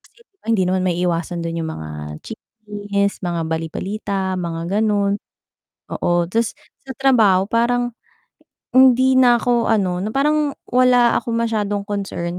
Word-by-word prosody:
kasi 470 - -25
'di 410 - -62
ba - - -36
hindi 215 -5 +2
naman 185 0 0
maiiwasan 175 -1 -1
do'n 165 0 -3
'yung 160 -1 -3
mga 80 0 -8 0.3
chismis, 205 -2 -4
mga 175 -3 -2
bali-balita, 190 +4 -3
mga 170 +4 -2
ganon 205 -2 +1 0.7
oo. 175 0 +1
'Tas, 230 0 0 0.3
sa 265 - -6
trabaho 225 -9 +4
parang, 240 +1 +1 0.8
hindi 260 0 +5
na 245 -2 +6
ako 240 -1 +1
ano, 190 -5 +1
na 215 - -3
parang 295 +1 +1 0.2
wala 250 -1 +4
akong 235 - -4
masyadong 215 -3 -1
concern 195 -4 -4
205 Hz, 140 wpm, -20 LUFS, 180-240 Hz, 0.8 s, na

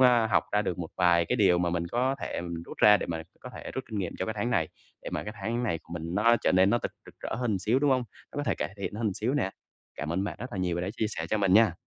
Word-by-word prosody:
a, 120 -3 +6
học 110 - +2
ra 105 0 +3
được 90 -3 -2
một 85 -2 -4
vài 85 -2 +4
cái 125 - 0
điều 95 -5 +5
mà 90 -1 +1
mình 85 0 -1
có 125 +7 +1
thể - - -3
mình 85 -1 -5
rút - - -10
ra 105 0 +8
để - - -4
mà 80 -1 -3 0.2
có - - -8
thể - - -7
rút 130 - -3
kinh 110 - -2
nghiệm 90 -3 -2
cho 95 - 0
cái 110 - -2
tháng 120 +4 0
này, 80 -10 +1 0.3
để - - -6
mà - - -2
cái 105 - -6
tháng 120 +2 -1
này 90 -9 0
của - - -13
mình 85 0 -4
nó 115 +4 +5
trở - - +3
nên 95 +2 +5
nó 120 - +3
thật - - -4
rực - - -16
rỡ - - -3
hơn 115 -5 0
xíu, 110 +7 +2
đúng 145 0 +2
hông? 130 -2 +2 0.3
Nó - - -10
có 145 - 0
thể - - +1
cải 100 - -4
thiện 100 0 -4
hơn 105 -3 -1
xíu 120 +8 -1
nè. 120 -10 +1 0.5
Cảm 75 +2 -3
ơn 95 +3 0
bạn - - -4
rất 125 +1 -6
là 100 - -4
nhiều 90 -2 0
vì 85 - -1
đã 90 - -2
chia 110 - +1
sẻ 80 -6 -4
cho 110 - +2
mình 95 -2 +3
nha! 110 +1 +6
100 Hz, 330 wpm, -28 LUFS, 90-120 Hz, 0.5 s, ra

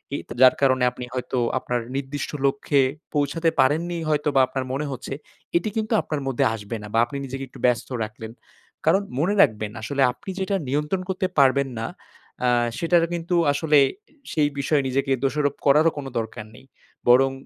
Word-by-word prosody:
এ - - -1
তে - - -7
যার 130 - +8
কারণে 130 -2 +3
আপনি 125 0 -7
হয়তো 125 0 -3 0.2
আপনার 125 -1 -2 0.2
নির্দিষ্ট 140 +1 -4
লক্ষ্যে 140 0 +2 0.3
পৌঁছাতে 150 +3 +1
পারেননি 165 +6 +2
হয়তো 150 0 +1
বা 135 - +6
আপনার 130 0 -3
মনে 145 +2 -2
হচ্ছে, 135 - -6 0.4
এটি 195 +5 -1
কিন্তু 220 +1 -1
আপনার 150 -3 -4
মধ্যে 135 -3 +1
আসবে 105 +2 -6
না - - -7
বা 115 - +3
আপনি 140 +4 -7
নিজেকে 135 +1 -6
একটু - - -15
ব্যস্ত 125 -2 +1
রাখলেন। 110 +1 -8 0.5
কারণ 185 +5 +4 0.2
মনে 185 +7 +2
রাখবেন 110 - +2
আসলে 140 +5 -2
আপনি 125 +10 -12
যেটা 195 +1 0
নিয়ন্ত্রণ 150 +7 -1
করতে 185 0 -1
পারবেন 135 0 +4
না 115 - -2 0.6
আ - - +4 0.3
সেটার 170 0 +3
কিন্তু 175 +1 -2 0.2
আসলে 150 0 +3 0.5
সেই 150 -2 +2
বিষয়ে 140 0 +1
নিজেকে 135 +1 -1
দোষারোপ 145 +1 +1
করারও 155 +3 +5
কোনো 135 -2 -5
দরকার 110 -1 -6
নেই। - - -16 0.4
বরং 135 +2 +6
140 Hz, 175 wpm, -23 LUFS, 130-155 Hz, 0.6 s, যার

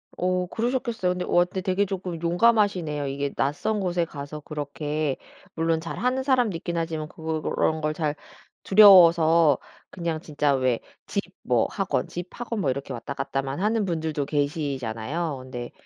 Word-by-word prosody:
어 180 0 0
그러셨겠어요. 235 -3 -1
근데 180 0 -3
와 175 - +4
근데 185 +1 -5
되게 190 +1 +1
조금 185 -3 -4
용감하시네요. 175 -5 +2
이게 140 +1 -3
낯선 210 +10 0
곳에 175 -3 0
가서 145 -1 -7
그렇게 150 -1 -3 0.4
물론 165 0 +1
잘하는 250 +10 -1
사람도 250 -8 +2
있긴 170 +1 -4
하지만 160 -2 -2
그런 160 0 -1
걸 155 0 0
잘 150 -2 -1 0.5
두려워서 170 -7 +7 0.3
그냥 170 -3 -3
진짜 150 -2 0
왜 130 -3 +1 0.3
집 - - -1 0.2
뭐 - - +2
학원 - - -1
집 175 +1 -5
학원 235 -2 -5
뭐 140 - +1
이렇게 140 +1 -3
왔다 120 +3 -5
갔다만 135 +1 -3
하는 215 0 +1
분들도 160 -5 -2
계시잖아요. 145 0 -2
근데 125 -2 -7
165 Hz, 330 characters per minute, -25 LUFS, 145-185 Hz, 0.5 s, 두려워서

